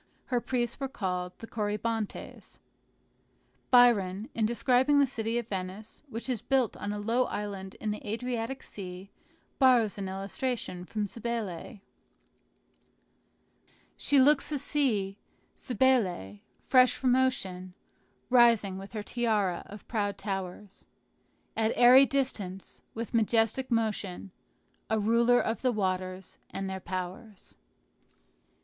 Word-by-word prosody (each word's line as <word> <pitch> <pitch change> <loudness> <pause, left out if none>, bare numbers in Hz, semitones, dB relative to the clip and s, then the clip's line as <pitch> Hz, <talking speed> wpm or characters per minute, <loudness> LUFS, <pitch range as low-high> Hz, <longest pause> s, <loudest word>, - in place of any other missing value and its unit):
Her 245 -2 0
priests 240 -1 -2
were 270 - -2
called 180 -7 -3
Corybantes. 215 0 -4 1.1
Byron, 225 -2 +4
in 220 -2 +1
describing 255 +4 +3
the 285 - +6
city 230 -3 -2
of 240 -2 -3
Venice, 195 +1 -6
which 235 0 -5
is 250 -5 -2
built 265 -4 +1
on 205 - -4
a 210 - -3
low 230 +5 +1
island 195 -2 -5
in 215 - -3
the 210 - -5
Adriatic 235 +3 -3
Sea, 185 0 -9 0.5
borrows 240 -6 +4
an 195 -1 -3
illustration 195 -1 -4
from 210 +2 -2
Cybele: 225 -2 -5 2.1
"She 285 - +3
looks 290 +3 +4
a 295 - 0
sea 225 -9 0 0.4
Cybele 205 - +1 0.2
fresh 255 -1 +5
from 255 -1 +2
ocean, 190 -9 -1 0.6
Rising 230 -6 +4
with 195 +3 -10
her 215 -2 -4
tiara 210 -7 0
of 205 0 -11
proud 205 -3 -1
towers 195 0 -6 0.7
At 220 0 +1
airy 255 +3 +8
distance, 205 -9 -3
with 230 0 -5
majestic 225 +3 +2
motion, 210 -5 -2 0.6
A 220 - +2
ruler 235 +3 +4
of 225 - -1
the 255 - +2
waters 185 -3 -3
and 195 0 -4
their 190 0 -4
powers." 185 +3 -7
220 Hz, 120 wpm, -29 LUFS, 195-245 Hz, 2.1 s, airy